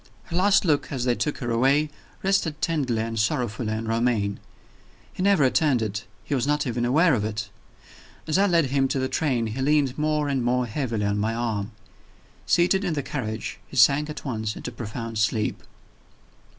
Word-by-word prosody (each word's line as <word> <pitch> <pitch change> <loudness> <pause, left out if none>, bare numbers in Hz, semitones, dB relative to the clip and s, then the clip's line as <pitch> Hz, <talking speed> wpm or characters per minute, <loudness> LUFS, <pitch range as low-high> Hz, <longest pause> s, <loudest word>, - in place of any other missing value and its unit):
Her 170 - -7
last 195 +2 +4
look, 150 -3 +1
as 130 -4 -2
they 125 - +3
took 150 +4 -2
her 120 -3 -3
away, 140 +6 +2 0.3
rested 190 -6 +1
tenderly 130 -9 0
and 115 -1 -3
sorrowfully 115 -2 -1
on 110 +1 -3
Romayne. 115 -3 0 0.7
He - - -6
never 195 -5 +4
returned 130 -2 +3
it 105 0 -4 0.2
he - - -4
was 135 0 0
not 150 0 +1
even 120 -1 -1
aware 155 +6 +4
of 110 -5 +1
it. 105 -1 -4 0.7
As 160 +4 +1
I 200 - +4
led 165 -7 +2
him 135 -1 +2
to 135 - -2
the 130 0 0
train 130 -6 0
he 110 +4 -4
leaned 145 -1 +2
more 150 -1 +1
and 135 -3 0
more 125 +1 +1
heavily 115 -3 -2
on 100 0 0
my 110 +2 0
arm. 110 -3 -2 0.8
Seated 180 +3 +3
in 180 -4 -1
the 145 - -2
carriage, 110 -6 -4
he 135 - -9
sank 140 +5 +5
at 150 - -7
once 110 -5 -3
into 125 - -6
profound 115 -1 -5
sleep. 105 +1 0
125 Hz, 190 wpm, -25 LUFS, 115-150 Hz, 0.8 s, sank